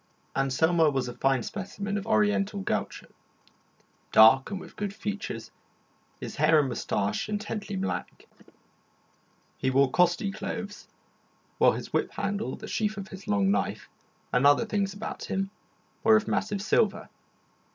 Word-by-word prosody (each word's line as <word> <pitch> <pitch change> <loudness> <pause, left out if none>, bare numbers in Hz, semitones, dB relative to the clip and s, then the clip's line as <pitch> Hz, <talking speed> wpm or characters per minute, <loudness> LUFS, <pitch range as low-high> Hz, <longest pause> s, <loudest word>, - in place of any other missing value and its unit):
Anselmo 160 +5 +3
was 135 -3 -1
a 120 - -5
fine 135 -1 +1
specimen 200 0 -5
of 205 -1 -3
the - - -7
Oriental 210 -2 +2
gaucho, - - -3 1.1
dark 115 +5 +7
and 200 -3 -4
with - - -12
good 200 -1 -4
features, 210 -1 -5 0.7
his - - -7
hair 160 - +5
and 140 -3 +1
moustache 105 - -2
intensely 210 0 -4
black. 190 +1 -4 1.3
He 130 - +1
wore 135 0 +3
costly 180 +4 +2
clothes, 205 +1 -6 0.7
while - - +6
his - - -7
whip - - 0
handle, 200 +2 -2
the - - -9
sheath 215 -1 -1
of 195 -1 -6
his 190 0 -10
long 100 -1 +2
knife, 100 - -1 0.4
and 125 +3 +5
other 145 +10 +5
things 200 -3 -1
about 210 +2 -6
him 195 0 -2 0.5
were 220 - +7
of 215 - +2
massive 205 -2 -1
silver. 210 -1 +1
195 Hz, 145 wpm, -27 LUFS, 135-205 Hz, 1.3 s, dark